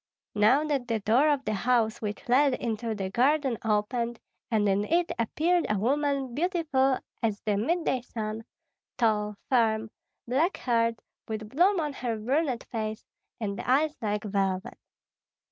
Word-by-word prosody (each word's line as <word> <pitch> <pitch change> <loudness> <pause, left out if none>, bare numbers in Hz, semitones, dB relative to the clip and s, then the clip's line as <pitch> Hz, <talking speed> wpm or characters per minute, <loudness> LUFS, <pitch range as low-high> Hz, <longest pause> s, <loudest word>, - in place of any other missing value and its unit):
Now 215 +8 +4
that 280 -5 -1 0.2
door 255 +8 +4
of 285 -2 0
the 215 - 0
house 225 +1 +1
which 210 +4 -5
led 265 +2 +4
into 225 -1 -3
the 190 -2 -4
garden 265 0 +2
opened, 230 +2 0 0.3
and 215 -3 +2
in 200 +1 +2
it 340 +9 +1
appeared 330 +9 +1
a 210 - +1
woman 275 +3 0
beautiful 300 -5 +1 0.2
as 215 -3 0
the 210 -2 0
midday 265 - 0
sun, 220 -2 -5 0.5
tall, 210 -3 +1
firm, 220 -3 +2 0.4
black 295 +10 +1
haired, 230 -2 +1 0.3
with 215 -1 -5
bloom 355 - +3
on 300 -3 -2
her 240 -4 -3
brunette 260 +3 0
face, 220 -1 -4 0.3
and 200 -3 -3
eyes 295 +4 +2
like 210 -1 -1
velvet. 195 +1 -2
235 Hz, 145 wpm, -28 LUFS, 215-280 Hz, 0.5 s, Now